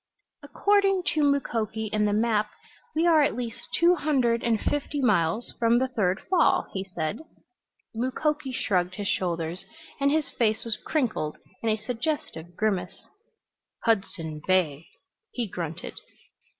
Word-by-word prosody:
"According 390 Hz, +5 st, +2 dB
to 310 Hz, -, +1 dB
Mukoki 225 Hz, -7 st, 0 dB
and 210 Hz, -1 st, +2 dB
the -, -, +1 dB
map 215 Hz, 0 st, +2 dB, 0.5 s
we 320 Hz, +2 st, +2 dB
are 325 Hz, -3 st, +6 dB
at 285 Hz, -, +2 dB
least 235 Hz, -2 st, -5 dB
two 345 Hz, +1 st, +6 dB
hundred 260 Hz, -8 st, +1 dB
and 230 Hz, -2 st, +2 dB
fifty 290 Hz, +3 st, -1 dB
miles 210 Hz, -3 st, +1 dB
from 235 Hz, 0 st, +4 dB
the 260 Hz, +2 st, +2 dB
third 195 Hz, -7 st, +1 dB
fall," 360 Hz, -2 st, +3 dB
he 190 Hz, -, -2 dB
said. 170 Hz, -, -3 dB, 0.7 s
Mukoki 265 Hz, +4 st, -1 dB
shrugged 180 Hz, -7 st, 0 dB
his 205 Hz, 0 st, -4 dB
shoulders 170 Hz, -1 st, -1 dB, 0.4 s
and 280 Hz, 0 st, +3 dB
his 310 Hz, 0 st, 0 dB
face 220 Hz, -1 st, 0 dB
was 230 Hz, -2 st, 0 dB
crinkled 230 Hz, -, -1 dB, 0.2 s
in 230 Hz, -, 0 dB
a 215 Hz, -, +2 dB
suggestive 225 Hz, -, -4 dB
grimace. 190 Hz, -4 st, -1 dB, 0.8 s
"Hudson 170 Hz, -8 st, -1 dB
Bay," 165 Hz, -5 st, +2 dB, 0.5 s
he 240 Hz, -3 st, -2 dB
grunted. 170 Hz, -4 st, -5 dB
225 Hz, 135 wpm, -26 LUFS, 185-280 Hz, 0.8 s, are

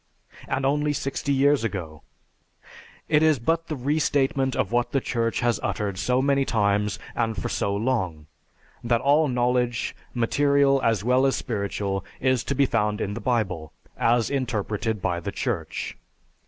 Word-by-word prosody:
And 135 Hz, -, -1 dB
only 150 Hz, +2 st, +1 dB
sixty 140 Hz, 0 st, -2 dB
years 140 Hz, -1 st, +3 dB
ago! 85 Hz, -8 st, -4 dB, 1.1 s
It 150 Hz, -1 st, +3 dB
is 155 Hz, -2 st, +4 dB
but 165 Hz, +7 st, 0 dB
the 155 Hz, -, -3 dB
restatement 135 Hz, -1 st, +1 dB
of 100 Hz, -, -1 dB
what 120 Hz, 0 st, 0 dB
the 135 Hz, -, +3 dB
Church 115 Hz, -3 st, -1 dB
has 120 Hz, -3 st, +1 dB
uttered 100 Hz, -3 st, -2 dB
so 125 Hz, +6 st, +1 dB
many 140 Hz, 0 st, +3 dB
times 105 Hz, -3 st, +1 dB, 0.2 s
and 115 Hz, -2 st, -1 dB
for -, -, -3 dB
so 100 Hz, 0 st, -1 dB
long 100 Hz, -9 st, -1 dB, 0.6 s
that 120 Hz, 0 st, +2 dB
all 145 Hz, +4 st, +3 dB
knowledge, 125 Hz, -1 st, 0 dB, 0.2 s
material 140 Hz, +3 st, +3 dB
as 115 Hz, -5 st, +1 dB
well 125 Hz, +3 st, +3 dB
as 135 Hz, -, +1 dB
spiritual, 100 Hz, -3 st, -2 dB, 0.2 s
is 130 Hz, -2 st, +1 dB
to 140 Hz, -, -1 dB
be 140 Hz, +1 st, +4 dB
found 105 Hz, -4 st, 0 dB
in 100 Hz, -, -2 dB
the 115 Hz, -, -6 dB
Bible 95 Hz, -, -1 dB, 0.2 s
as 115 Hz, +1 st, +2 dB
interpreted 110 Hz, -5 st, -2 dB
by 85 Hz, -1 st, 0 dB
the 85 Hz, -, -4 dB
Church. -, -, -3 dB
120 Hz, 155 wpm, -25 LUFS, 105-135 Hz, 1.1 s, is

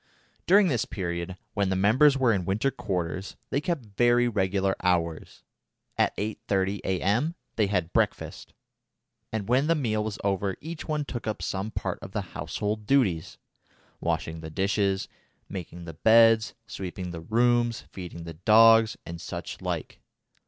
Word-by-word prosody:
During 195 Hz, +2 st, +6 dB
this 125 Hz, -9 st, +1 dB
period, 85 Hz, -1 st, -4 dB, 0.2 s
when 100 Hz, -2 st, +1 dB
the 95 Hz, -, +1 dB
members 130 Hz, +9 st, +5 dB
were 125 Hz, -4 st, +3 dB
in 95 Hz, -3 st, 0 dB
winter 105 Hz, +9 st, 0 dB
quarters, 95 Hz, -6 st, -3 dB, 0.2 s
they 140 Hz, -, +1 dB
kept 165 Hz, -7 st, -2 dB
very 120 Hz, +4 st, +3 dB
regular 95 Hz, -3 st, +1 dB
hours. 85 Hz, -3 st, -1 dB, 0.5 s
At -, -, +1 dB
8.30 100 Hz, -2 st, -1 dB
A.M. 105 Hz, -, 0 dB, 0.2 s
they 105 Hz, -3 st, +2 dB
had 90 Hz, -4 st, -1 dB
breakfast, -, -, -1 dB, 0.8 s
and 110 Hz, -3 st, -3 dB
when 130 Hz, +5 st, +3 dB
the 165 Hz, -, +3 dB
meal 110 Hz, -7 st, 0 dB
was 105 Hz, -2 st, -4 dB
over 100 Hz, -1 st, 0 dB
each 160 Hz, +1 st, -7 dB
one 150 Hz, -2 st, -1 dB
took 120 Hz, -4 st, -6 dB
up 110 Hz, -, -3 dB
some 95 Hz, +2 st, -2 dB
part -, -, -3 dB
of 95 Hz, -, -9 dB
the 105 Hz, -, -1 dB
household 105 Hz, 0 st, -3 dB
duties 105 Hz, -, +1 dB, 0.6 s
washing 80 Hz, 0 st, -2 dB
the 80 Hz, -, -7 dB
dishes, 95 Hz, +3 st, 0 dB, 0.4 s
making 90 Hz, -2 st, -7 dB
the 80 Hz, -, -7 dB
beds, 115 Hz, +5 st, +5 dB
sweeping 90 Hz, -3 st, -6 dB
the 85 Hz, -1 st, -7 dB
rooms, 120 Hz, +4 st, +2 dB
feeding 90 Hz, -2 st, -8 dB
the 85 Hz, 0 st, -7 dB
dogs, 110 Hz, +5 st, +6 dB
and 85 Hz, 0 st, -7 dB
such -, -, -6 dB
like. -, -, -4 dB
105 Hz, 150 wpm, -27 LUFS, 95-120 Hz, 0.8 s, During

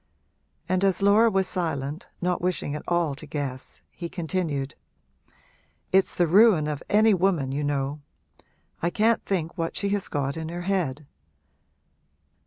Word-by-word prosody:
And 185 Hz, +1 st, +1 dB
as 195 Hz, 0 st, +2 dB
Laura 210 Hz, +3 st, +6 dB
was 190 Hz, -3 st, +1 dB
silent, 160 Hz, -4 st, -3 dB, 0.2 s
not 180 Hz, 0 st, 0 dB
wishing 180 Hz, -5 st, -1 dB
at 150 Hz, -, -4 dB
all 175 Hz, -4 st, +1 dB
to 135 Hz, -, -9 dB
guess, 135 Hz, -3 st, -5 dB
he 170 Hz, -2 st, -7 dB
continued 160 Hz, -6 st, -2 dB, 1.2 s
'It's 190 Hz, 0 st, +3 dB
the 175 Hz, -, +3 dB
ruin 190 Hz, -2 st, +5 dB
of 150 Hz, -2 st, -3 dB
any 215 Hz, +1 st, +5 dB
woman, 175 Hz, -8 st, +1 dB
you 145 Hz, +2 st, -2 dB
know; 145 Hz, 0 st, -2 dB, 0.8 s
I 170 Hz, -, +1 dB
can't 220 Hz, +5 st, +2 dB
think 170 Hz, -4 st, -2 dB
what 165 Hz, 0 st, -2 dB
she 200 Hz, -, -1 dB
has 200 Hz, -1 st, -1 dB
got 140 Hz, 0 st, -2 dB
in 160 Hz, 0 st, -4 dB
her 175 Hz, +1 st, -5 dB
head.' 170 Hz, -7 st, -1 dB
170 Hz, 150 wpm, -25 LUFS, 145-190 Hz, 1.2 s, Laura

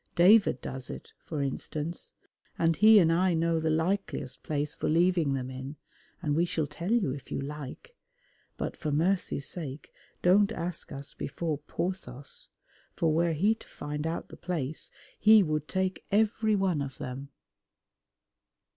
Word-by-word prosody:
David 185 Hz, -, +6 dB
does 130 Hz, -1 st, -5 dB
it, -, -, -8 dB
for 150 Hz, -3 st, -3 dB
instance, 150 Hz, +4 st, -4 dB, 0.4 s
and 165 Hz, 0 st, +3 dB
he 215 Hz, +4 st, +7 dB
and 165 Hz, -4 st, +5 dB
I 180 Hz, +1 st, +3 dB
know 165 Hz, 0 st, +2 dB
the 160 Hz, 0 st, 0 dB
likeliest 160 Hz, -4 st, -1 dB
place 150 Hz, 0 st, -2 dB
for -, -, -2 dB
leaving 170 Hz, -3 st, +3 dB
them 130 Hz, -1 st, -4 dB
in, 130 Hz, +3 st, -6 dB, 0.5 s
and 145 Hz, -1 st, +1 dB
we 165 Hz, -, +3 dB
shall 160 Hz, -3 st, 0 dB
tell 170 Hz, +7 st, -5 dB
you 230 Hz, -, +2 dB
if 135 Hz, 0 st, -8 dB
you -, -, -1 dB
like, 150 Hz, -, -7 dB, 0.6 s
but -, -, -3 dB
for 155 Hz, -3 st, -3 dB
mercy's 165 Hz, -2 st, +1 dB
sake 150 Hz, -5 st, -5 dB, 0.3 s
don't 200 Hz, +4 st, +5 dB
ask 170 Hz, -2 st, -4 dB
us 140 Hz, 0 st, -7 dB
before 155 Hz, 0 st, -3 dB
Porthos, 150 Hz, -5 st, -5 dB, 0.5 s
for 160 Hz, -2 st, +2 dB
were 170 Hz, +1 st, +2 dB
he 200 Hz, +8 st, +3 dB
to 225 Hz, -, -13 dB
find 150 Hz, +1 st, -4 dB
out 165 Hz, -, -4 dB
the -, -, -11 dB
place 160 Hz, -5 st, -3 dB, 0.3 s
he 215 Hz, -1 st, +7 dB
would 155 Hz, -2 st, -1 dB
take 190 Hz, 0 st, -1 dB
every 215 Hz, +1 st, +3 dB
one 190 Hz, -6 st, +1 dB
of 135 Hz, -2 st, -5 dB
them. 135 Hz, +2 st, -6 dB
165 Hz, 155 wpm, -29 LUFS, 145-185 Hz, 0.6 s, he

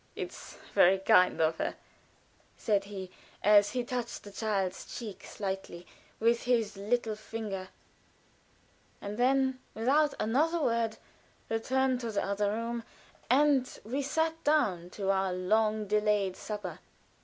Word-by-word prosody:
"It's -, -, -7 dB, 0.2 s
very 185 Hz, +2 st, +6 dB
kind 185 Hz, -1 st, +4 dB
of 160 Hz, 0 st, +2 dB
her," -, -, -1 dB, 0.8 s
said 200 Hz, -2 st, +1 dB
he, 190 Hz, -2 st, -7 dB, 0.3 s
as 205 Hz, +1 st, +6 dB
he 250 Hz, -1 st, 0 dB
touched 245 Hz, -1 st, -4 dB
the 205 Hz, -, -10 dB
child's 200 Hz, -3 st, -2 dB
cheek 215 Hz, -5 st, -7 dB
slightly 190 Hz, -3 st, -5 dB, 0.3 s
with 230 Hz, +1 st, +3 dB
his 230 Hz, -4 st, +1 dB
little 220 Hz, +2 st, -1 dB
finger, 210 Hz, -3 st, -5 dB, 1.3 s
and 205 Hz, +3 st, -6 dB
then, 265 Hz, +1 st, +2 dB, 0.2 s
without 285 Hz, +6 st, +2 dB
another 310 Hz, +10 st, +2 dB
word, 230 Hz, -5 st, 0 dB, 0.5 s
returned 260 Hz, +3 st, +1 dB
to 235 Hz, -, -3 dB
the 205 Hz, -, 0 dB
other 200 Hz, +1 st, 0 dB
room, 230 Hz, +2 st, -3 dB, 0.5 s
and 270 Hz, 0 st, +3 dB
we 250 Hz, +7 st, -2 dB
sat 320 Hz, +3 st, -1 dB
down 200 Hz, -, +2 dB
to 195 Hz, +1 st, -1 dB
our 190 Hz, -1 st, +1 dB
long 215 Hz, +3 st, +1 dB
delayed 210 Hz, -2 st, +1 dB
supper. 210 Hz, -1 st, -6 dB
220 Hz, 130 wpm, -30 LUFS, 200-250 Hz, 1.3 s, very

